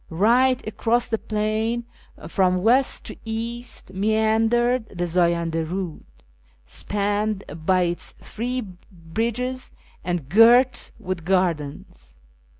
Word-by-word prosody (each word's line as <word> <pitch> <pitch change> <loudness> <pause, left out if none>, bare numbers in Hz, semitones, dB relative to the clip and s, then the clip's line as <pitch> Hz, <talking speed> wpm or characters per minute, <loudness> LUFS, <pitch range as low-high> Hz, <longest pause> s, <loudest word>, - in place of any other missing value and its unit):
Eight 245 +8 +3
across 230 +2 0
the 225 -2 0
plain 220 +2 -1 0.4
from 180 +1 +1
west 250 +4 +3
to - - -7
east 230 -1 -5
meandered 220 +3 +2
the 175 -2 -3
Zayanda 170 -1 +1
Ptud, 175 0 -4 0.6
spanned 205 - -1 0.2
by 185 -1 +4
its 175 0 -2
three 250 +3 -3 0.3
bridges, 230 +9 -3 0.3
and 175 -5 -2
girt 240 - +5
with 185 -2 -5
gardens. 170 -6 -2
215 Hz, 100 wpm, -23 LUFS, 180-235 Hz, 0.6 s, girt